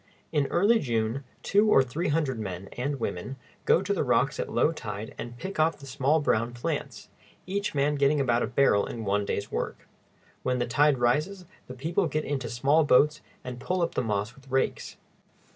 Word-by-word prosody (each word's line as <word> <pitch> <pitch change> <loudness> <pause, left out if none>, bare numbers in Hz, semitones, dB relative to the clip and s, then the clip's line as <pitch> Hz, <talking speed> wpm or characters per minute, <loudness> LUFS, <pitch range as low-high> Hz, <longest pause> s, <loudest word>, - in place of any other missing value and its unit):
In 145 -2 +1
early 210 +6 +3
June, 115 - -1 0.2
two 210 +2 +3
or 135 - +6
three 145 +8 -3
hundred 145 -5 0
men 95 -2 -5
and 140 +3 -3
women 115 +4 -4 0.3
go - - +4
to - - 0
the - - 0
rocks - - +1
at - - -3
low 155 - +3
tide 110 -7 -6
and 120 0 -7
pick 190 +4 -6
off 160 +1 +3
the 140 - -12
small 135 +3 +1
brown 120 -4 0
plants, 120 - -4 0.4
each 200 -2 -2
man 145 +1 +2
getting 140 +1 +2
about 120 -3 +2
a - - 0
barrel 125 -5 +3
in 115 -2 -6
one 100 +1 +1
day's 100 0 -3
work. - - -4 0.5
When 125 0 0
the 120 - 0
tide 145 +3 +3
rises, 150 +11 0 0.2
the 125 - -8
people 165 +7 0
get 155 +1 -2
into 135 -4 -3
small 140 +7 +3
boats 150 +2 +4 0.2
and 125 -1 -6
pull 180 +7 -1
up 165 - -1
the - - 0
moss 105 -1 -2
with 135 +1 -19
rakes. 130 0 -1
135 Hz, 195 wpm, -27 LUFS, 120-155 Hz, 0.5 s, or